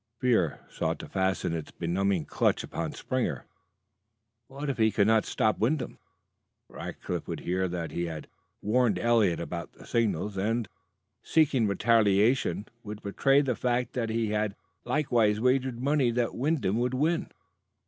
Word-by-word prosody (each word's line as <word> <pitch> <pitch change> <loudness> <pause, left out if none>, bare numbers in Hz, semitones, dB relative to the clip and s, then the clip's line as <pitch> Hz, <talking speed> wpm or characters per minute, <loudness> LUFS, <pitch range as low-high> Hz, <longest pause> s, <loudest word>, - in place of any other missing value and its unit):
Fear 115 - +1
sought - - -2
to - - -8
fasten 95 -2 0
its 80 -2 -4
benumbing 90 0 -1
clutch - - +1
upon - - -4
Springer. - - -2 1.0
What 140 +2 -6
if 135 -4 -2
he 110 0 +5
could 100 - +3
not 110 0 +3
stop 110 - +1
Wyndham? 130 +6 -1 0.7
Rackliff - - -6
would - - -4
hear 95 +1 0
that 85 -2 -4
he 85 - -2
had 80 -3 -6 0.4
warned 120 +2 +2
Eliot 115 -7 +3
about 85 0 -5
the - - -15
signals, 105 -3 0
and, 110 +4 0 0.5
seeking 145 -8 +3
retaliation, 105 +2 +3 0.2
would 105 -1 -8
betray 135 +7 +3
the 135 -3 0
fact 125 0 -1
that 115 -3 -1
he 110 -1 0
had 105 -1 0 0.3
likewise 115 -8 +2
wagered 125 0 +1
money 140 -1 +2
that 120 0 0
Wyndham 125 - 0
would 125 +1 0
win. 160 +5 0
110 Hz, 150 wpm, -28 LUFS, 100-125 Hz, 1.0 s, he